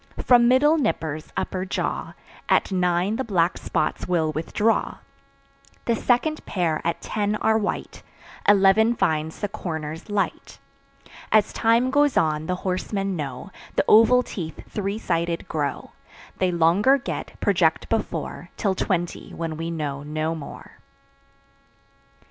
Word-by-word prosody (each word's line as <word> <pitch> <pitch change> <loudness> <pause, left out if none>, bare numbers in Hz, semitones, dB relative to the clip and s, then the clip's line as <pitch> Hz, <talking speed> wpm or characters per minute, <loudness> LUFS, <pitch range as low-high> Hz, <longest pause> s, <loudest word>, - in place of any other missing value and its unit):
From 240 -1 +5
middle 295 +6 +4
"nippers" 160 - -2
upper 185 -1 -2
jaw, 190 - -3 0.4
At - - +3
nine 180 +3 +1
the 265 - -1
black 180 -6 +1
spots - - -2
will 165 -3 +1
withdraw. 205 +8 0 0.9
The 235 - +2
second 260 +7 +1
pair 170 -5 0
at 170 0 -2
ten 210 0 -1
are 220 +1 +2
white; 210 - -4 0.5
Eleven 205 +3 +5
finds 160 -4 -1
the 205 - 0
"corners" 165 -4 -6
light. 205 -1 -2 0.7
As 215 -1 +3
time 235 +3 +2
goes 290 -1 +3
on, 155 0 +1
the 180 - 0
horsemen 195 +1 -1
know, 145 +4 -6 0.2
The - - +2
oval 230 +3 +6
teeth 160 -10 -6
three 200 0 -3
sided 170 -5 -2
grow; 145 -3 -3 0.5
They 185 -1 +2
longer 175 +11 +4
get, 275 - -6
project - - +2
before, - - -3
Till 200 -3 +1
twenty, 175 -2 -2
when 165 -1 -4
we 165 +1 -4
know 150 -4 -3
no 155 +2 -2
more. 155 -3 -10
185 Hz, 130 wpm, -24 LUFS, 160-220 Hz, 0.9 s, oval